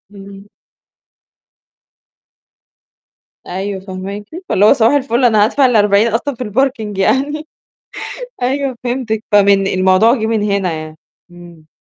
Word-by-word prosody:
إمم. 200 +1 -13 3.0
أيوه، 190 +2 -4
فهماكِ 195 +2 -7 0.3
فاللي 205 - +3
هو - - +7
صباح 225 +4 +2
الفل 260 -3 +1
أنا 215 -3 +4
هادفع 270 +4 +2
ال40 210 -2 +3
أصلًا 240 +4 -2
في 250 - -5
الparking 220 -3 -2
يعني، 290 +9 0 1.0
أيوه، 265 0 -1
فهمتِك 240 -3 -3
فمن 200 -1 +4
الموضوع 185 +5 +3
جِه 220 -4 -2
من 220 -2 0
هنا 200 -4 -1
يعني، 155 0 -7 0.3
إمم. 175 -3 -15
210 Hz, 115 wpm, -15 LUFS, 195-245 Hz, 3.0 s, هو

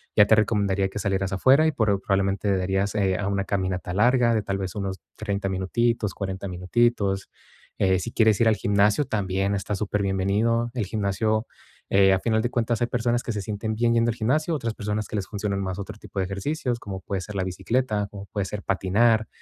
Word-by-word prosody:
ya 105 - +7
te 110 - +6
recomendaría 100 -3 +1
que 95 - -8
salieras 95 -1 -1
afuera, 135 +10 +5
y - - +2
pro 105 -4 +1
probablemente 100 +1 0
darías, 95 +2 -1
eh, 95 -3 +1
a 100 - -2
una 100 -1 0
caminata 95 -2 -2
larga, 120 +3 +3
de 110 - +1
tal 100 -1 -2
vez 95 -1 -4
unos 95 -2 -3 0.2
30 100 -2 -2
minutitos, 105 +3 0
40 95 0 -4
minutitos. 95 +1 0 0.5
Eh, 95 -1 +3
si 120 - -5
quieres 110 -3 +3
ir 115 - +5
al 110 - +3
gimnasio, 100 +5 +2
también 100 -4 -1
está 100 +1 -2
superbienvenido, 105 +4 0
el 115 -5 -1
gimnasio, 110 +2 -1 0.4
eh, 95 -1 +5
a 95 - +2
final 110 +1 +1
de 120 - -1
cuentas, 120 -1 0
hay 120 - +2
personas 120 0 0
que - - -3
se 105 - -3
sienten 105 +2 -3
bien 115 +1 +2
yendo 115 0 +3
al 115 - -1
gimnasio, 150 +8 0
otras 115 -6 -2
personas 105 0 -3
que - - -6
les 95 - -3
funcionan 100 -1 -2
más 95 -1 -3
otro 100 +1 -7
tipo 105 - -13
de 95 - +1
ejercicios, 120 - -2
como 95 -4 -7
puede 95 -1 -3
ser 105 +2 -8
la 95 - 0
bicicleta, 105 +3 -1
como 100 -1 -8
puede 100 -1 -3
ser 100 +2 -6
patinar, 110 +4 +2
100 Hz, 205 wpm, -25 LUFS, 95-115 Hz, 0.5 s, ya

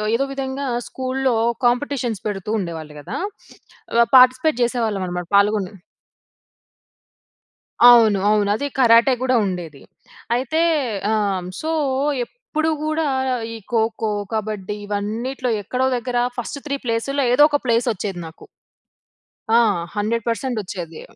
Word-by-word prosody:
ఏదో 270 +4 +1
విధంగా, 270 0 -4 0.2
స్కూల్‌లో 260 -1 -1 0.3
కాంపిటీషన్స్ 245 -3 0
పెడుతూ 200 -1 -4
ఉండేవాళ్ళు 165 -5 -6
కదా! 145 - -6 0.8
ఆహ్, 235 0 +5
పార్టిసిపేట్ 255 +2 +4
చేసేవాళ్ళం 230 -5 -1
అన్నమాట. 180 -1 -4
పాల్గొని. 200 -1 +1 2.1
అవును. 235 -4 +7
అవును. 210 -1 +2
అది 285 +6 -2
కరాటే 235 +1 +6
కూడా 260 0 +2
ఉండేది. 170 -7 -5 0.5
అయితే 260 +6 -1 0.5
ఆ! - - +2 0.5
సో, 315 - -3 0.6
ఎప్పుడు 320 - -3 0.2
కూడా 310 +1 0 0.5
ఈ - - -6 0.2
ఖోఖో, 220 -1 0 0.2
కబడ్డీ 210 -2 -3
ఇవన్నిట్లో 225 +6 -3
ఎక్కడో 250 +6 -1
దగ్గర 245 0 -3 0.2
ఫస్ట్ 245 +4 -4
3 280 -1 -2
ప్లేసుల్లో, 250 +5 -1
ఏదో 285 +4 +6
ఒక 290 -1 +1
ప్లేస్ 235 0 +1
వచ్చేది 195 -2 -5
నాకు. 160 - -14 1.1
ఆ! 230 - +5 0.4
100% 230 +3 -1
ఒచ్చేది. 170 -4 -7
230 Hz, 115 wpm, -21 LUFS, 205-260 Hz, 2.1 s, అవును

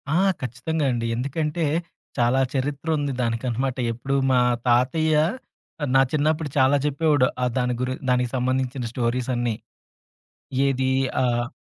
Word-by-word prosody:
ఆ! - - +4 0.2
ఖచ్చితంగా 135 +5 -2
అండి. 115 -1 -2
ఎందుకంటే, 150 +6 -2 0.5
చాలా 125 +2 +3
చరిత్రుంది 145 +2 -1
దానికనమాట. 120 +2 -1 0.2
ఎప్పుడు 135 +4 -3 0.2
మా 125 - +4 0.3
తాతయ్య 150 +6 +3 0.7
ఆహ్, 145 - -1
నా 135 - +7
చిన్నప్పుడు 155 0 +1
చాలా 130 +1 +5
జెప్పేవాడు. 145 -2 +2 0.2
ఆ - - +3
దాని 125 0 +1
గురి 130 0 -1 0.2
దానికి 125 -1 +2
సంబంధించిన 130 0 -1
స్టోరీసన్నీ. 120 -1 -1 1.1
ఏదీ 130 -1 +1 0.3
ఆహ్ 120 -1 0
130 Hz, 120 wpm, -24 LUFS, 125-145 Hz, 1.1 s, నా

